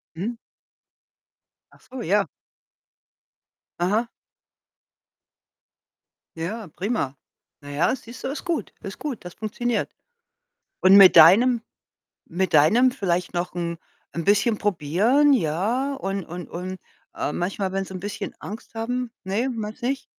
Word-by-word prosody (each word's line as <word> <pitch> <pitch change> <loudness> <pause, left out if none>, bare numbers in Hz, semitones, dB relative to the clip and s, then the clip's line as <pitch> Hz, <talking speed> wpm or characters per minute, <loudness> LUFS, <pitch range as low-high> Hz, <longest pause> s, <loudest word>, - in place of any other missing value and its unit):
Mhm. 220 +8 -3 1.4
Ach - - -22
so, 255 -1 -6
ja. 200 0 +2 1.5
Aha. 210 +7 +1 2.3
Ja, 200 +5 -4
prima. 195 - -2 0.5
Na 145 - -11
ja, 150 - +1
siehst 235 0 -12
du, - - -2
ist 285 - -5
gut. 340 -3 -3
Ist 195 - -7
gut, 285 -10 -5
das 175 - -9
funktioniert. 225 +2 -2 0.9
Und 190 +1 +7
mit 195 -3 +9
deinem 225 +9 +7 0.7
mit 185 0 -2
deinem 230 - +5
vielleicht 180 -7 -1
noch 175 0 -2
'n 170 -1 -2 0.4
'n 170 - -3
bisschen 210 +3 +3
Probieren, 205 - +2
ja, 230 - 0
und 195 -5 -3
und 175 +2 -8
und, 185 +2 -6 0.4
äh, 150 - -2
manchmal, 190 +1 -2
wenn 195 0 -1
sie 190 - -10
'n - - -4
bisschen 205 +1 -5
Angst 215 +3 -9
haben 245 +1 -2
ne, 210 +7 -1
meinste 225 +1 -5
nicht? 270 +1 -1
200 Hz, 130 wpm, -24 LUFS, 180-240 Hz, 2.3 s, mit